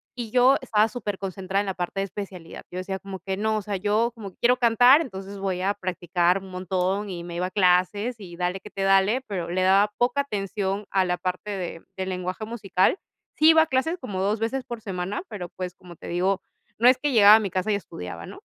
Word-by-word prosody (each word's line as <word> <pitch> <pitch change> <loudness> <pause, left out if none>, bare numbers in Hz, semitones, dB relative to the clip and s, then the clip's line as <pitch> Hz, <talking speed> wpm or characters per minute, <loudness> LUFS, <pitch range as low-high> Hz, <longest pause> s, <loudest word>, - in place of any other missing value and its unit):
y 235 -3 -5
yo 255 +2 +5
estaba 220 -3 +2
superconcentrada 195 -4 -3
en - - -4
la 190 - -1
parte 180 +2 -3
de - - +1
especialidad. 190 -4 -8
Yo 180 - -6
decía 190 +1 -4
como 195 -1 -8
que: 190 +2 -4
"No, 220 +1 0
o 215 - -2
sea, 200 0 -3
yo 215 +5 +1
como 210 -5 -8
que - - -32
quiero 250 +1 +4
cantar, 245 +5 +6
entonces 195 -5 -7
voy 190 -2 -2
a 200 +2 +1
practicar 180 -1 0
un 190 -1 -12
montón", 185 +2 -1
y 170 -2 -5
me 170 -1 -7
iba 180 +1 -1
a 185 - -10
clases 200 +5 +2
y 180 -4 -10
dale 180 +1 -1
que 210 - -12
te 195 -1 -4
dale, 195 +6 +3
pero 180 -5 -4
le 185 +1 0
daba 195 +2 +4
poca 250 +4 +2
atención 200 -4 -3
a 190 -1 +2
la 180 0 0
parte 185 +3 -4
de 180 -4 -5
de 190 - -2
lenguaje 185 +3 -4
musical. 210 - +1 0.4
Sí 310 +1 +6
iba 320 0 +6
a 320 - -5
clases 290 +7 0
como 195 -7 -4
2 205 +3 0
veces 240 +4 -2
por 240 -1 -7
semana, 190 - -4
pero, 180 -5 -6
pues, 180 0 -6
como 175 -1 -13
te - - -11
digo, 185 +3 0 0.4
no 240 - +5
es 255 - +7
que 290 0 0
llegaba 210 -3 +8
a 220 - +5
mi 200 -3 -2
casa 190 +4 -1
y - - +2
estudiaba, 90 - -7
¿no? - - -11
195 Hz, 235 wpm, -25 LUFS, 185-220 Hz, 0.4 s, llegaba